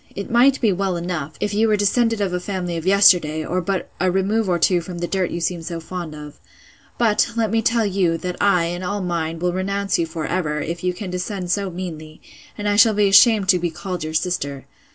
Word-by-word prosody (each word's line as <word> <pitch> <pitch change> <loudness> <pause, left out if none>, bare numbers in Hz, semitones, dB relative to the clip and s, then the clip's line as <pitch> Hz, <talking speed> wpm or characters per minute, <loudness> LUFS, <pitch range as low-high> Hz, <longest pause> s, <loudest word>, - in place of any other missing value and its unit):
It 200 +3 -6
might 255 +3 +4
be 220 -4 +3
well 190 -1 -1
enough, 170 -4 -4
if 210 0 -2
you 220 +2 +2
were 215 - +3
descended 225 +2 +1
of 190 -3 -1
a 180 - -1
family 180 -2 -4
of 165 +2 -5
yesterday, 175 -6 +4
or 185 +1 -1
but 190 +2 -2
a 185 - +2
remove 195 +3 0
or 175 - +2
two 175 +1 +2
from 175 +1 -8
the 175 - -2
dirt 185 0 -1
you 170 - -4
seem 170 0 -2
so 165 0 -5
fond 165 -1 -7
of. 150 -1 -11 0.6
But, 225 -2 +2
let 225 -3 0
me 225 0 +2
tell 230 -1 +1
you, 185 -4 +1
that 180 +2 -4
I, 195 -4 +3
and 175 +2 -4
all 205 +2 -2
mine, 165 -2 -2
will 175 +1 -1
renounce 195 +1 -1
you 165 - 0
for 160 -1 -5
ever, 155 -5 -2
if 170 +3 -5
you 180 - +1
can 190 -1 -6
descend 180 0 -4
so 200 0 0
meanly; 160 -4 -7 0.4
and 205 - -3
I 205 0 +1
shall 215 0 +6
be 205 -1 +3
ashamed 205 0 +6
to 180 - +5
be 175 0 -1
called 175 +1 -5
your 155 0 -5
sister. 145 -5 -2
180 Hz, 235 wpm, -21 LUFS, 170-200 Hz, 0.6 s, shall